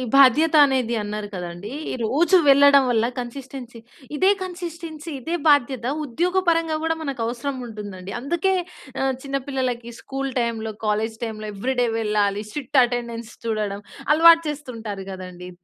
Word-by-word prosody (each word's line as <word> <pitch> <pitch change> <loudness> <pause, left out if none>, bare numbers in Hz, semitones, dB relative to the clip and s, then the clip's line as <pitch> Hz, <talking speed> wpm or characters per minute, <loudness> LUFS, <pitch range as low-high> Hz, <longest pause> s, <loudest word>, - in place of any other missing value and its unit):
బాధ్యత 280 +4 +6
అనేది 255 -4 0
అన్నారు 210 0 -4
కదండీ. 180 +4 -6 0.3
రోజు 330 - +4
వెళ్ళడం 280 0 +7
వల్ల, 225 -1 +2
కన్‌సిస్టెన్సీ 250 -1 -7 0.4
ఇదే 380 +6 +4
కన్‌సిస్టెన్సీ, 335 -3 -7
ఇదే 330 +7 -2
బాధ్యత, 260 -4 +3 0.2
ఉద్యోగపరంగా 330 +2 +1
కూడా 325 0 +1
మనకు 275 -5 -4
అవసరం 250 +4 -3
ఉంటుందండి. 200 -4 -8
అందుకే 345 +8 0 0.5
ఆహ్, 265 0 +1
చిన్న 275 0 -2
పిల్లలకి 250 -3 -2
స్కూల్ 270 0 -4
టైమ్‌లో, 225 -2 -2
కాలేజ్ 215 +1 0
టైమ్‌లో 215 -2 -5
ఏవ్రీడే 245 +4 0
వెళ్ళాలి 210 -1 0
స్ట్రిక్ట్ 270 +2 +2
అటెండెన్స్ 235 -1 -3
చూడడం, 210 -3 -2 0.3
అలవాటు 330 +1 +7
చేస్తుంటారు 230 -9 -6
కదండీ! 180 -1 -8
250 Hz, 125 wpm, -23 LUFS, 220-295 Hz, 0.5 s, వెళ్ళడం